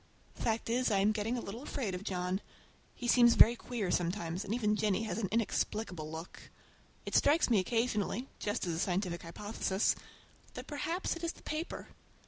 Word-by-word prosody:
The - - -12
fact 225 0 0
is, 245 +2 +2
I 205 - +3
am 200 +2 +4
getting 220 +3 -1
a - - -2
little 225 +4 -6
afraid 255 -8 -3
of 180 +2 -4
John. 185 -1 -1 0.5
He 245 - -5
seems 240 -1 +6
very 235 - +8
queer 230 -6 -3
sometimes, 175 0 -1
and 200 - -6
even 215 -2 +2
Jennie 210 0 +1
has 220 0 -2
an 195 -5 -1
inexplicable 210 -6 -1
look. 160 +2 -8 0.6
It - - -5
strikes 295 -2 +4
me 220 - +6
occasionally, 225 +3 0
just 205 -2 -1
as 170 - -1
a 160 - -2
scientific 180 -1 -1
hypothesis, 195 +3 0 0.6
that - - -6
perhaps 325 +6 -2
it 335 - -9
is 335 - -1
the - - -18
paper! 310 +2 -4
215 Hz, 185 wpm, -33 LUFS, 185-240 Hz, 0.6 s, very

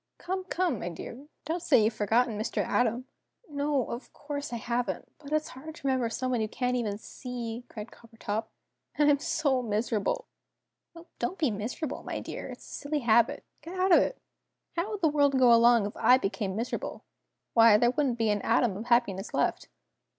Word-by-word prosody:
Come, 375 +1 -4
come, 345 - 0
my 175 - -3
dear! 240 - -9 0.2
Don't 330 +3 -2
say 275 -9 +4
you've 220 +2 +2
forgotten 220 +2 +1
Mr. 215 +1 -1
A. - - +2
Tom." 240 +2 -2 0.4
"No, 285 -3 0
of 235 - -7
course 290 -1 -5
I - - -3
haven't. 240 +2 -2
But 290 -1 -11
it's 310 0 0
hard 310 +5 -9
to 275 - -13
remember 260 -3 +1
someone 255 0 -1
you 215 - 0
can't 250 +3 -1
even 215 -5 -1
see," 240 +1 -6
cried 215 -1 -8
Coppertop. 225 -1 -5 0.5
"And 295 -1 +5
I'm 285 - +3
so 280 -4 +1
miserable!" 225 - -1 0.7
"Oh, 335 0 -12
don't 375 - -2
be 300 -7 +1
miserable, 230 +8 -4
my - - -4
dear. - - -6
It's - - -10
a - - -8
silly 290 0 -2
habit! 235 -1 +3 0.2
Get 340 +5 -8
out 375 +1 +3
of - - +8
it. - - 0 0.6
How 340 +5 -1
would 420 -2 -5
the 325 - +4
world 285 -2 +3
go 250 -2 +6
along 235 -2 +6
if 205 - -5
I 250 - +5
became 195 -4 -2
miserable? 230 +3 -4 0.5
Why 225 -2 +7
there 240 +2 +3
wouldn't 265 -3 0
be 225 -2 +2
an 205 -1 0
atom 215 -6 +2
of 220 - -6
happiness 235 -5 +1
left!" - - 0
245 Hz, 195 wpm, -29 LUFS, 225-290 Hz, 0.7 s, of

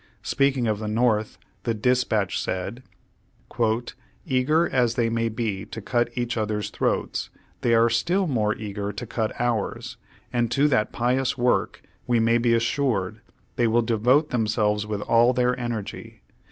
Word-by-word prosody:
Speaking 135 -2 +1
of 110 -2 0
the 110 - -4
North, 110 -1 +1 0.2
the 115 -2 -1
Dispatch 110 -3 +1
said: 95 +7 -4 1.4
"Eager 155 +4 +2
as 120 -3 +1
they 115 -2 +1
may 115 0 0
be 110 -4 -3
to 115 - -8
cut 120 +3 0
each 120 -1 -1
others' 105 -1 -2
throats, - - -1 0.3
they 115 -1 +3
are 115 +1 +5
still 170 +12 +1
more 110 -8 0
eager 100 -1 -4
to 105 +4 -6
cut 110 -1 -2
ours, 120 -4 -2 0.4
and 120 -1 +1
to 140 +5 +3
that 110 -6 +1
pious 125 +2 0
work, 125 0 0 0.2
we 120 -1 +3
may 115 +1 +3
be 115 0 +3
assured, 115 -4 0 0.4
they 120 - +3
will 115 +1 +3
devote 125 +7 +2
themselves 105 -2 0
with 105 -1 -3
all 115 +3 +4
their 125 0 +2
energy. 120 -4 -6
115 Hz, 155 wpm, -24 LUFS, 110-125 Hz, 1.4 s, are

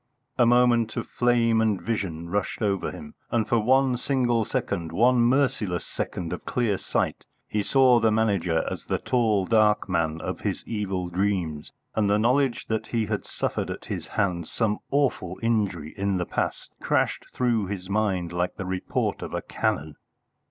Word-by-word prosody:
A 120 - +6
moment 120 -2 +3
of - - -2
flame 115 -2 +2
and 110 -4 +1
vision 90 -8 -3
rushed 100 +4 -2
over 100 -2 0
him, 75 0 -9 0.2
and 115 -2 0
for 120 - +3
one 130 +3 +3
single 120 -3 +1
second 85 -5 -2
one 125 +3 +4
merciless 120 - +1
second 85 -1 -4
of 90 - -6
clear 115 -6 0
sight - - -1 0.2
he 105 - -1
saw 130 +2 +5
the 115 -1 +3
Manager 100 -7 +1
as - - -5
the - - 0
tall 110 -6 +1
dark 105 -1 +3
man 80 -3 0
of - - -4
his - - -3
evil 95 -5 -2
dreams, 90 -5 -1 0.2
and 105 -2 +1
the 105 - +4
knowledge 125 +3 +2
that 110 -1 -2
he 115 -2 0
had 105 -1 -3
suffered - - -2
at - - -6
his - - -5
hands 90 -5 -1
some 110 -3 0
awful 130 -10 0
injury 100 -9 0
in 100 -1 0
the 90 - -1
past - - -3
crashed - - 0
through 115 -5 +1
his 95 -2 -5
mind 95 -4 0
like 90 +1 -1
the 100 - -5
report 95 0 -2
of - - -5
a - - -2
cannon. 75 +1 -2
105 Hz, 175 wpm, -26 LUFS, 90-120 Hz, 0.2 s, A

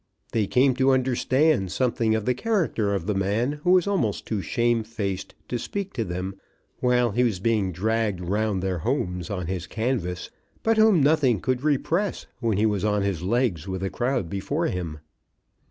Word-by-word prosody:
They 110 -3 +1
came 130 +3 +4
to 135 0 +3
understand 130 - +2
something 115 -3 +1
of 110 -1 -2
the 125 - +2
character 130 - 0
of 90 -4 -3
the 105 - 0
man 110 +10 0
who - - +1
was 185 -2 +4
almost 180 - 0
too 110 -3 -2
shame 120 +2 +1
faced 105 -4 -4
to 120 - -2
speak 200 - -4
to 115 - -1
them 95 +1 -5 0.4
while 125 -2 +2
he 120 +5 +2
was 110 -7 0
being 105 -2 +1
dragged 105 +1 0
round 100 +2 -1
to - - -3
their 95 -2 -1
homes 90 - -2
on 90 -4 -3
his 90 -1 -4
canvas, 110 -7 -2 0.3
but 225 0 +2
whom 215 -8 +5
nothing 140 -7 +3
could 130 +2 -1
repress 160 +7 0
when 115 -5 0
he 105 - +3
was 105 -3 0
on 105 -1 +1
his 100 -5 -1
legs 100 - 0
with 95 0 -3
a 95 - -2
crowd 125 -6 -1
before 140 - -2
him. 85 - -3
110 Hz, 185 wpm, -25 LUFS, 95-130 Hz, 0.4 s, whom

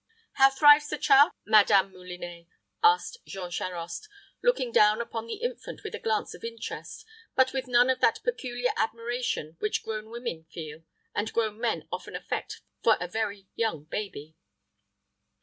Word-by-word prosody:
"How 270 0 +6
thrives 290 +2 +6
the 300 - -2
child, 285 +3 +6
Madame 205 -2 +5
Moulinet?" 180 -2 -9 0.3
asked 445 +2 +3
Jean 180 -2 -6
Charost, 175 - -5 0.3
looking 270 - +2
down 210 0 +5
upon 230 -1 -4
the 415 - -6
infant 485 0 -5
with - - -6
a - - -4
glance 440 -1 -1
of - - -13
interest, 460 -1 -7 0.3
but 260 0 +4
with 265 -1 -2
none 245 0 +5
of 260 -1 +1
that - - +3
peculiar 250 - -1
admiration 230 -7 -2
which 210 - -1
grown 220 0 -5
women 235 -9 -5
feel 160 -1 -8 0.3
and 210 +2 -2
grown 220 -2 -1
men - - -1
often - - -6
affect - - -4 0.2
for 225 - +5
a 180 - -3
very 200 0 -3
young 220 -10 -1
baby. 160 -3 -6
225 Hz, 155 wpm, -28 LUFS, 185-270 Hz, 0.3 s, How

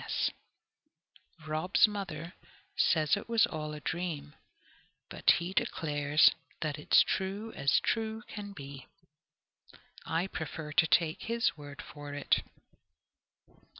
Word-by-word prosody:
P.S. - - 0 1.2
Rob's 155 +7 +4
mother 185 -5 -5 0.4
says 155 -3 +3
it 205 - -7
was 230 -1 +5
all 155 -3 -5
a 150 - -6
dream, 155 -3 -4 0.8
but - - +1
he 175 +2 -4
declares 145 -3 +3 0.3
that 155 -2 -2
"it's - - +6
true 200 +4 -2
as 140 - +3
true 220 0 -1
can 205 -1 -7
be!" 140 -7 -9 1.2
I 165 +3 0
prefer 160 -4 -5
to 160 +2 +4
take 155 +1 +2
his 230 -3 0
word 145 -2 -9
for 145 -1 -9
it. 145 - +2
160 Hz, 115 wpm, -31 LUFS, 145-195 Hz, 1.2 s, it's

